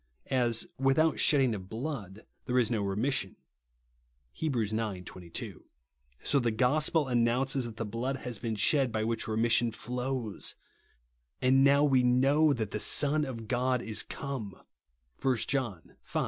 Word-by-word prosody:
As 120 -3 +2
" - - -47
without 155 +3 +2
shed 150 - +5
ding 130 -4 +2
of 95 -3 -7
blood 110 - -5 0.3
there 125 - +1
is 120 -3 +2
no 110 -3 0
remission 100 +2 -1 0.5
" - - -43
(Heb. 155 -4 0
ix. 110 -3 0
22); 90 -5 -5 0.6
so 140 - +2
the 120 -2 +1
gospel 145 +6 +2
announces 125 +2 +1
that 115 -2 -8
the 115 - -3
blood 120 +6 -3
has 120 -5 -5
been 115 -2 -3
shed 130 +5 +2
by 110 -1 -1
which 115 0 -2
remission 115 +1 +2
flows; 125 -1 -4 0.8
and 130 +1 +4
now 140 +1 +5
we 135 -3 +4
know 135 +5 +4
that 110 -7 -2
"the 105 - -3
Son 150 +6 +3
of 115 -5 -7
God 125 +1 +1
is 110 -2 +1
come" 125 -9 -6 0.6
(1 130 -2 +2
John 120 -11 -3
v. - - -3
120 Hz, 160 wpm, -30 LUFS, 110-135 Hz, 0.8 s, shed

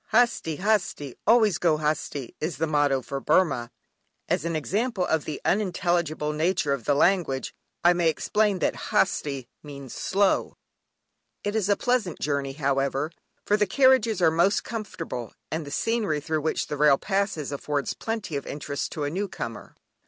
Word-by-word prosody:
"Hasti, 225 -10 +2
hasti, 185 - 0
always 215 -5 +5
go 165 -3 +3
hasti" 150 -4 -2
is 155 -3 -2
the 160 - +1
motto 145 -4 +2
for 135 +3 -4
Burmah. 145 -8 +2 0.6
As 150 - 0
an 165 -1 -1
example 195 - -1
of 160 -3 0
the 150 - -4
unintelligible 175 -6 0
nature 155 -2 +1
of 130 -5 -4
the 145 - +3
language 155 -5 +1 0.3
I 175 +1 +6
may 175 -2 +2
explain 210 +5 +1
that - - 0
"Hasti" 140 -4 +1 0.2
means 140 -4 -9
"slow!" 195 0 +1 0.9
It 205 +1 -2
is 210 -3 +1
a 205 - +4
pleasant 245 -9 0
journey 140 -2 -1
however, 140 +1 0 0.3
for 205 - +3
the 210 -1 +2
carriages 235 -4 +4
are 160 - +6
most 170 +5 +2
comfortable, 165 - -5 0.2
and 160 -2 -3
the - - -5
scenery 210 -2 0
through 155 +1 -2
which 160 - -1
the 150 - -4
rail 145 -1 +5
passes 195 -7 -1
affords 145 0 -2
plenty 220 -8 -4
of 140 - -4
interest 145 0 -4
to 150 - -3
a 145 - -1
new 200 +5 -2
comer. 115 - -7
160 Hz, 165 wpm, -26 LUFS, 145-200 Hz, 0.9 s, I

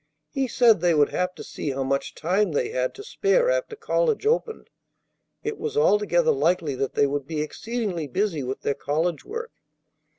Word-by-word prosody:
He 270 -1 0
said 230 -6 +4
they 175 -2 +3
would 145 -1 +4
have 180 0 -1
to - - -8
see 150 - -5
how 135 0 -1
much 135 +1 -2
time 185 +2 +1
they 135 - 0
had 130 0 -1
to 410 - -9
spare 485 +3 +2
after - - -1
college 455 -1 0
opened. 450 0 0 0.7
It 440 0 -3
was 445 -1 -3
altogether 470 +1 +3
likely 180 - +1
that 135 0 -3
they - - +4
would 140 -1 -2
be 155 -1 -2
exceedingly 195 -1 -3
busy 180 +1 -1
with 130 +1 -4
their 140 - 0
college 155 +4 -1
work. 460 +2 -6
190 Hz, 185 wpm, -25 LUFS, -, 0.7 s, said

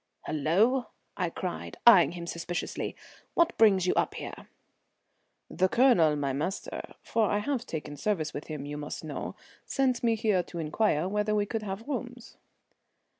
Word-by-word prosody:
"Hullo!" 205 - +2 0.3
I 180 -3 -1
cried, 85 - -5
eying 185 -7 +8
him 170 -1 -6
suspiciously. 170 +1 -4 0.4
"What 340 0 +3
brings 195 -5 +5
you 180 - +2
up - - 0
here?" - - -8 1.0
"The 185 +1 +1
Colonel, 210 - +5
my 140 -2 -1
master 155 +8 -4
for 220 -3 +1
I 205 - +2
have 250 +3 -2
taken 150 -2 -5
service 165 -3 -1
with 145 - -6
him, 150 -3 -5
you 145 0 -5
must 150 +2 -6
know 155 -2 -5 0.3
sent 265 -3 +1
me 230 -1 +3
here 215 -4 +2
to 175 - -10
inquire 165 +1 +1
whether 210 +2 0
we 205 -1 +2
could 220 +1 -3
have 205 +3 -6
rooms." 245 -3 -5
190 Hz, 160 wpm, -29 LUFS, 155-225 Hz, 1.0 s, eying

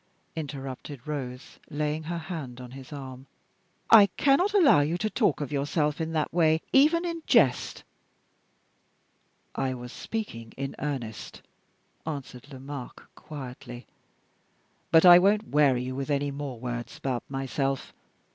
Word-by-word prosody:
interrupted 140 -3 -6
Rose, 135 -4 -6
laying 150 0 -2
her 170 +2 -3
hand 155 -7 -6
on 125 -1 -9
his 135 +1 -11
arm. 135 -2 -8 0.6
"I 215 -3 +9
cannot 290 +9 +3
allow 360 - +6
you 150 +4 +1
to 215 +3 -2
talk 205 - +1
of 145 - -4
yourself 150 +2 0
in 160 0 -2
that 155 -1 -1
way, 160 -2 +3
even 315 +6 +5
in 335 -1 -3
jest." 130 -3 +3 1.7
"I 130 -1 -1
was 125 0 -9
speaking 115 - -5
in 135 0 -4
earnest," 130 -7 -5 0.6
answered 140 -3 -7
Lomaque, 135 -1 -8
quietly; 125 -4 -9 1.0
"but 165 +2 +6
I 175 0 +10
won't 205 +3 +2
weary 140 -4 +3
you 130 +1 -4
with 135 +2 -4
any 145 0 0
more 140 -4 -6
words 120 -1 -5
about 130 -3 -2
myself. 135 0 -2
145 Hz, 135 wpm, -27 LUFS, 130-160 Hz, 1.7 s, I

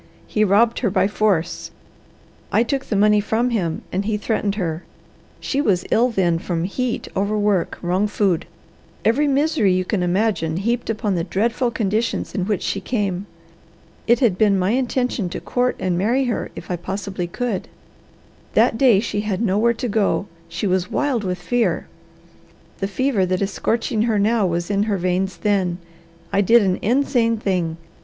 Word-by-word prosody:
He 215 - +1
robbed 215 +4 +3
her 230 - +1
by 190 0 +2
force. 195 -5 0 0.8
I - - +4
took 270 +3 -2
the 215 - -2
money 210 +1 +4
from 225 +4 0
him, 175 -8 -1
and 190 +2 -1
he 210 0 -1
threatened 210 -1 -1
her. 170 -4 -3 0.6
She 280 - -1
was 185 -9 +1
ill 240 +3 +4
then 175 -7 +1
from 165 -1 -2
heat, 240 +6 -2
overwork, 205 -1 0
wrong 185 +4 +1
food 200 -5 0 0.6
every 280 +7 +3
misery 280 - +2
you 185 0 0
can 195 0 -1
imagine 180 -3 0
heaped 235 +5 -1
upon 215 -2 -1
the 170 -2 0
dreadful 235 +7 0
conditions 220 0 -1
in 190 -4 -1
which 210 -3 -1
she 200 - -2
came. 200 -4 -2 0.8
It 235 +2 +4
had 210 -8 +2
been 205 -2 +4
my 185 +2 +1
intention 250 -5 0
to 175 - -5
court 250 0 0
and 180 -2 -1
marry 240 +8 +2
her 245 -3 -2
if - - -8
I 175 - -1
possibly 190 0 -4
could. 225 +1 -3 0.9
That 225 - +3
day 235 -7 +5
she 210 -2 -2
had 210 -3 -2
nowhere 225 +2 +2
to 245 - -3
go; 205 -2 +1 0.2
she 165 +5 -3
was 185 -1 0
wild 270 -7 0
with 180 -2 -2
fear; 235 +7 0 0.9
the 195 - -1
fever 235 0 0
that 185 +2 0
is 195 - -2
scorching 220 +5 -1
her 225 -1 +1
now 210 0 +2
was 170 +2 -2
in 200 0 +1
her 200 - +1
veins 185 +1 -1
then. 185 -2 0 0.6
I 200 - +4
did 230 +3 +5
an 185 -2 0
insane 240 -1 +2
thing. 180 -6 -1
205 Hz, 175 wpm, -21 LUFS, 185-230 Hz, 0.9 s, day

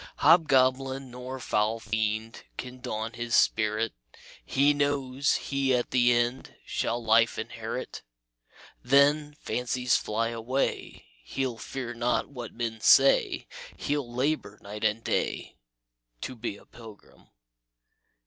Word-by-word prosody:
"Hobgoblin 135 -4 +3
nor 125 +1 -7
foul 110 -1 0
fiend 110 +1 -2 0.2
Can 125 0 -7
daunt 115 -2 -4
his 120 0 -1
spirit; 110 0 +2 0.5
He 140 +2 +3
knows 140 -1 0
he 135 -2 0
at 120 - -2
the 125 -1 +4
end 120 +2 0
Shall 120 +1 -2
life 115 +1 +4
inherit. - - -5 0.8
Then, 145 +3 +3
fancies 125 0 0
fly 115 +2 -1
away, 120 +4 -3 0.2
He'll 130 - -3
fear 125 -3 -5
not 120 +1 0
what 125 -5 -7
men 115 -2 -4
say; 135 +3 +5 0.3
He'll 145 -4 -2
labor 125 -5 -1
night 105 +2 -7
and 110 +1 +1
day - - -2 0.6
To 130 - -5
be 115 -3 -5
a - - -18
pilgrim." 110 -3 -15
120 Hz, 120 wpm, -28 LUFS, 115-135 Hz, 0.8 s, say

